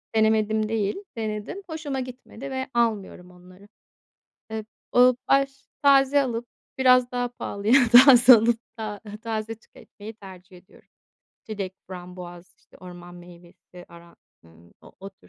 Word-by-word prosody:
denemedim 220 0 +1
değil, 210 -3 -1 0.2
denedim. 215 - -5
Hoşuma 300 -4 -5
gitmedi 255 +1 -9
ve 260 0 -4
almıyorum 210 -6 -2
onları. 185 +2 -18 0.8
Eee, 220 -1 -5 0.3
ııı, 250 0 +6
baş 275 0 0
Taze 280 0 +4
alıp 240 -2 -4 0.3
biraz 255 -1 +4
daha 245 0 -2
pahalıya 215 -1 -2 0.2
taze 250 0 +9
alıp 230 +1 +2 0.2
ta 215 -2 -6 0.2
taze 225 -1 -4
tüketmeyi 220 -1 -14
tercih 190 -3 -14
ediyorum 180 - -21 0.6
çilek, 195 -4 -6
frambuaz, 180 -1 -11
işte, - - -22
orman 175 -1 -12
meyvesi 175 0 -16
aran 170 0 -17 0.3
ııı, 85 +1 -21
o - - -17
o 195 +1 -9
tür 195 - -25
220 Hz, 130 wpm, -24 LUFS, 185-245 Hz, 0.8 s, taze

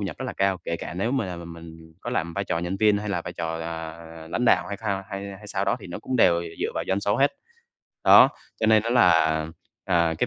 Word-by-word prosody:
nhập 100 -3 -4
rất - - -4
là - - -4
cao, 95 -1 +1
kể 85 - -2
cả 85 - -7
nếu 105 +8 -1
mà 130 -7 0
là 90 -1 -5
m 85 0 -8
mình 80 -1 -12
có 120 - -5
làm 85 -9 -1
vai 100 - -2
trò 85 - -1
nhân 85 +3 -3
viên 105 0 +3
hay 105 +1 -5
là 90 -4 -1
vai 85 - -6
trò, 80 -1 -4
ờ, 80 0 -6 0.3
lãnh 125 - -1
đạo - - +4
hay 100 - -4
thao 100 -2 -2
hay 100 0 -5
hay 105 - -13
sao - - -2
đó - - +1
thì - - -9
nó - - -6
cũng 130 - -3
đều 85 -7 +4 0.2
dựa - - 0
vào - - -2
doanh 95 +1 +1
số 100 +1 +1
hết. 140 +1 +3 0.7
Đó, - - +9 0.3
cho 110 - +2
nên 110 -1 +5
á 115 - -2
là, 120 0 +6 0.7
à, 85 -3 +2
cái - - +1
95 Hz, 270 wpm, -25 LUFS, 85-105 Hz, 0.7 s, Đó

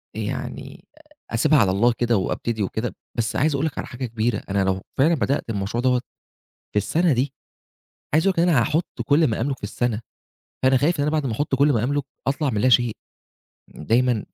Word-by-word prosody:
يعني - - -5 0.5
أسيبها 135 +6 +3
على 100 -5 +3
الله 115 +5 +3
كده 120 -2 +2
وأبتدي 110 +3 -2
وكده. 110 +5 -3 0.2
بس 110 -2 -1
عايز 150 +2 +2
أقول 140 - 0
لك 160 - -3
على - - -4
حاجة 130 +1 -5
كبيرة، 115 -1 -1
أنا 100 0 +1
لو 95 0 0 0.2
فعلًا 155 +6 +4
بدأت 140 -4 -1
المشروع 105 +3 -2
دوّة 125 -1 +3 0.7
في - - -1
السَنة 160 - +2
دي، 130 +2 0 0.8
عايز 160 +4 +3
أقول 195 - +4
لك 180 - -8
إن 175 - +3
أنا 145 -8 +4
هاحُط 160 +8 +1 0.2
كل 155 +2 +4
ما 110 - -2
أملُك 135 +2 -1
في - - -8
السَنة، 110 +1 -1 0.6
فأنا 130 0 +5
خايف 150 +7 +1
إن - - +2
أنا 150 - 0
بعد 155 -2 0
ما 125 - -1
أحُط 135 +4 -1
كل 140 +1 +4
ما 110 - +1
أملُك 145 +3 0 0.2
أطلع 140 +1 +1
من 105 -3 -1
لا 130 - +4
شيء. 120 -2 +4 0.8
دايمًا 115 +5 +1
125 Hz, 205 wpm, -23 LUFS, 110-145 Hz, 0.8 s, فأنا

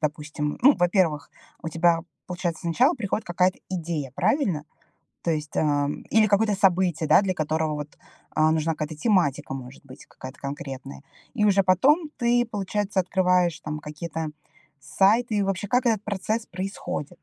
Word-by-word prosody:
допустим 150 0 -3
Ну, 280 +2 +7
во-первых, 175 -5 +1 0.3
у 160 - -3
тебя, 165 +1 +2 0.3
получается, 175 -1 -3
сначала 245 - +3
приходит 215 -2 -3
какая-то 180 +1 +1
идея, 165 -7 -4
правильно? 190 - +1 0.6
То 170 - 0
есть, 150 -1 -4
ам 145 -1 0
Или 220 -1 +4
какое-то 205 +1 +2
событие, 180 -4 +2
да, - - +7
для 190 -2 -1
которого 155 -1 -1
вот, 150 0 -7 0.3
а, 155 0 +3
нужна 160 0 +1
какая-то 155 0 -5
тематика, 155 - +1
может 130 +1 -9
быть, 130 -1 -13
какая-то 130 +2 -11
конкретная. 135 - -7 0.3
И 210 - +1
уже 200 -1 +4
потом 290 - +3
ты, 240 -1 +2
получается, 205 -1 -2
открываешь 180 -2 +1
там 155 0 -5
какие-то 155 +1 -5 0.5
сайты. 210 - +2
И 200 - +2
вообще 195 +1 -2
как 245 +3 +1
этот 215 -3 +1
процесс 215 +2 -2
происходит? 185 -5 -5
175 Hz, 155 wpm, -25 LUFS, 150-200 Hz, 0.6 s, Ну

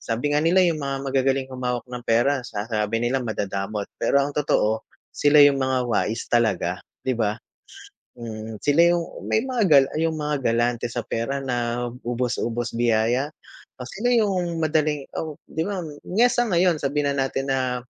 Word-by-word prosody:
Sabi 120 +6 -2
nga - - +4
nila, 175 +4 +4
'yong 170 -3 +2
mga 140 -1 -3
magagaling 135 0 +1
humawak 125 -2 -3
ng 125 -1 -7
pera, 130 +4 +2
sa 105 -1 -4
sabi 110 +1 0
nila 125 +3 +1
madadamot. 100 -2 -3
Pero 140 - +3
ang 145 +1 -2
totoo, 110 -7 +1 0.3
sila 145 0 +4
'yong 145 -1 +6
mga 130 0 +1
wais 115 +1 0
talaga, 95 -7 +1 0.2
'di 130 - +1
ba? 110 -1 0 0.8
Mm, 110 -2 -7
sila 145 +3 +3
'yong 175 -1 +2 0.2
may 220 - +2
mga 255 -3 -1
gal 140 -3 +7
'yong 160 0 +1
mga 150 0 -1
galante 120 +1 +1
sa 120 0 -3
pera 115 +4 -2
na, 120 -1 -1 0.2
ubos-ubos 120 -1 -2
biyaya 120 +4 +2 0.5
o 125 - -6
sila 240 +5 -2
'yong 185 -7 +1
madaling 155 -2 0
oh, 155 -2 -4
di 160 - -2
ba? 200 -2 -3 0.3
Niya 230 +7 +3
sa 240 -1 +1
ngayon, 175 -2 +3
sabihin 140 0 0
na 135 - +1
natin 135 +1 -3
na, 130 -2 -1
130 Hz, 170 wpm, -23 LUFS, 115-150 Hz, 0.8 s, gal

